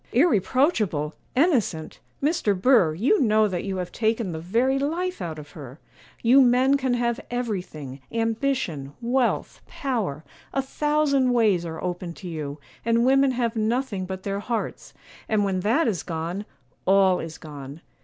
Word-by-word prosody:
'Irreproachable! 220 - +2 0.2
innocent! 250 - +1 0.2
Mr. 280 - +1
Burr, 190 -9 +4
you 260 - +2
know 215 -3 +4
that 180 -3 -3
you 195 -1 -3
have 180 -1 -4
taken 220 -3 0
the 160 - -4
very 240 +11 +1
life 350 +6 -2
out 160 -2 -4
of 150 -1 -10
her; 140 -4 -10 0.5
you 250 +4 +7
men 255 +2 +4
can 260 -3 +1
have 240 0 0
everything, 180 - -4
ambition, 225 - -1
wealth, 245 +1 0
power; 215 - -3 0.3
a 270 - +3
thousand 280 -2 +1
ways 205 -8 +2
are 160 0 -6
open 175 -1 -4
to 185 - -9
you; 150 -3 -5 0.2
and 230 +1 +2
women 270 +1 +5
have 240 -2 -1
nothing 220 -3 -1
but 190 0 -6
their 200 0 -2
hearts, 230 +2 -4 0.3
and 210 -2 +2
when 190 -2 0
that 235 - +2
is 190 -8 0
gone, 170 +5 -4 0.4
all 190 -1 +5
is 165 0 -6
gone. 145 -1 -9
215 Hz, 155 wpm, -25 LUFS, 175-255 Hz, 0.5 s, you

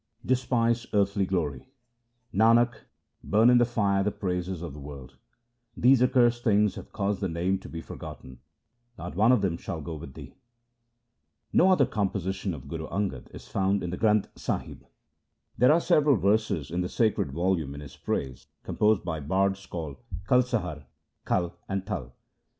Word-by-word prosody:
Despise 120 -2 +1
earthly 100 -1 +2
glory: 75 -9 -2 0.4
— 120 +1 -45
Nanak, 115 +4 +4 0.5
burn 110 +4 +4
in 125 - +6
the 120 - +5
fire 100 -5 +1
the 105 - +1
praises 90 -3 -3
of 85 -5 -6
the 75 - -9
world; 70 -2 -10 0.6
These 125 +1 +5
accursed 120 -1 +3
things 105 -2 +3
have - - -10
caused 100 -1 -2
the 95 - -1
Name 90 +4 0
to - - -11
be 80 - -6
for - - -9
gotten; 65 -1 -10 0.6
not 85 0 -7
one 110 +6 +4
of 125 -6 +3
them 85 -4 0
shall 85 - -5
go 80 +2 -6
with 75 -3 -9
thee. - - -10 1.2
No 185 - +5
other 180 -8 +5
composition 95 -3 -2
of 65 - -11
Guru 80 -1 -5
Angad 95 -10 -3
is - - -12
found 100 +1 0
in 90 - -3
the 90 - -4
Granth 105 -2 +3
Sahib. - - -5 0.7
There 125 +3 +5
are 160 - +5
several 150 -5 +4
verses 100 -7 +1
in 90 +2 -1
the 90 - -2
sacred 110 - +1
volume 85 -3 -1
in 70 - -8
his 70 -2 -11
praise, 65 -1 -4 0.2
composed 105 -3 +1
by 80 -3 -2
bards 95 +5 0
called 80 -5 -6 0.3
Kalsahar, 105 - +1 0.4
Kal, 85 -1 -1
and 95 -1 -2
Tal. 70 - -5
95 Hz, 170 wpm, -27 LUFS, 85-115 Hz, 1.2 s, in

